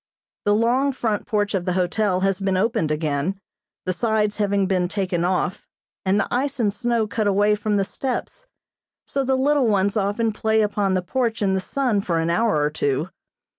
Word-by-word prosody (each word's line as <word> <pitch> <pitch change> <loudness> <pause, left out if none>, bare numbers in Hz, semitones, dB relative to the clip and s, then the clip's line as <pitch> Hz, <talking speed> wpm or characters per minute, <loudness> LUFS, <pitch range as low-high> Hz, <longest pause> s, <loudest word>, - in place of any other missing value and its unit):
The 205 0 +4
long 250 +5 +2
front 220 -5 -2
porch 205 -1 0
of 185 -3 -1
the 180 - 0
hotel 185 +1 +1
has 195 0 +1
been 195 -1 0
opened 190 -6 +1
again, 155 +4 -1 0.5
the 185 - 0
sides 215 0 0
having 200 -2 +1
been 185 -2 +1
taken 185 -2 -1
off, 180 0 -1 0.4
and 195 +2 +2
the - - 0
ice 270 +2 -1
and 210 -4 +1
snow 235 +1 0
cut 215 0 -1
away 205 +1 +3
from 210 0 0
the 195 - +2
steps, 270 - -4 0.6
so 275 - -1
the 265 0 +1
little 280 -1 +2
ones 200 -2 +2
often 210 +2 0
play 220 +1 +1
upon 200 -2 0
the 185 - 0
porch 230 +3 -1
in 195 -1 +2
the 190 - 0
sun 245 -2 0
for 170 -4 -1
an 165 +1 0
hour 195 0 +2
or 150 - +1
two. 145 +2 -1
205 Hz, 195 wpm, -22 LUFS, 185-225 Hz, 0.6 s, The